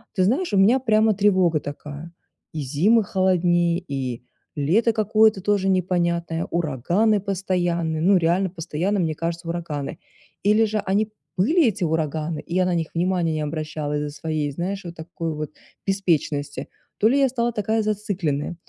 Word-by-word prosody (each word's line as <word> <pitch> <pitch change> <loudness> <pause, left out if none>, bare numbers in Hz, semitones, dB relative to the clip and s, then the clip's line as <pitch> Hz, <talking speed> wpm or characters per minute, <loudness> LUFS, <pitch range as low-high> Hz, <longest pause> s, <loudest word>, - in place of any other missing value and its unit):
ты 185 - +2
знаешь, 265 - +1
у - - +3
меня 215 +7 +5
прямо 220 -3 +3
тревога 185 -5 +3
такая: 145 +3 -8 0.4
и 155 - -4
зимы 185 - +3
холоднее, 175 -2 +2
и 130 -4 -4 0.3
лето 200 +11 +2
какое-то 215 -1 +3
тоже 200 -1 +1
непонятное, 170 -2 0
ураганы 175 - +1
постоянные. 175 -4 -1
Ну, 195 +4 +4
реально 175 +3 +1
постоянно, 175 +4 -2
мне 160 -2 0
кажется, 170 +1 -4
ураганы. 165 -5 -4 0.4
Или 210 +3 +4
же, 215 0 -1
они 205 +2 0 0.3
были 305 - +3
эти 210 -3 -1
ураганы, 155 -1 -1
и 170 - -6
я 185 0 +3
на 180 - 0
них 165 -2 -1
внимания 175 -2 +1
не 155 - -2
обращала 150 -1 -3
из-за 150 0 -2
своей, 155 -1 -3
знаешь, 185 +6 -4
вот 170 0 -7
такой 165 0 -5
вот 150 -1 -5 0.4
беспечности, 160 -7 -1 0.3
то 215 - +5
ли 275 - +3
я 275 - +4
стала 240 -1 -1
такая 220 +1 0
зацикленная. 190 -8 -2
175 Hz, 155 wpm, -23 LUFS, 160-205 Hz, 0.4 s, меня